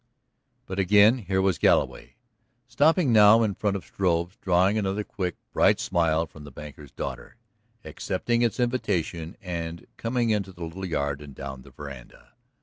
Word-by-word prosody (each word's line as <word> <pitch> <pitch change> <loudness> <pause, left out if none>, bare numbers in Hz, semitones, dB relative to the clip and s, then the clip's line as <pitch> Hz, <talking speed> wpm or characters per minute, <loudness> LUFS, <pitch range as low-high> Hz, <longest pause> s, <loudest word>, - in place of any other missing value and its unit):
But 95 +1 -5
again 105 +5 +5
here 95 -2 -1
was 95 -5 +1
Galloway, - - +1 0.5
stopping 145 +3 +3
now 110 +1 +7
in 105 -2 0
front 100 0 -1
of 95 - -11
Struve's, 90 -1 -1
drawing 95 +2 +3
another 105 0 -1
quick, 90 -4 -4 0.2
bright - - +4
smile 85 -2 +1
from 80 -2 -14
the 75 - -10
banker's 75 +1 -11
daughter, 65 -3 -6 0.5
accepting 120 0 -2
its 120 -2 0
invitation 95 -9 -2
and 85 -2 -5
coming 115 0 0
into 100 -3 -1
the 85 - -9
little 95 +4 -6
yard 70 -3 -2
and 70 -2 -11
down 65 -1 -7
the - - -15
veranda. 70 -4 -11
95 Hz, 155 wpm, -26 LUFS, 80-105 Hz, 0.5 s, now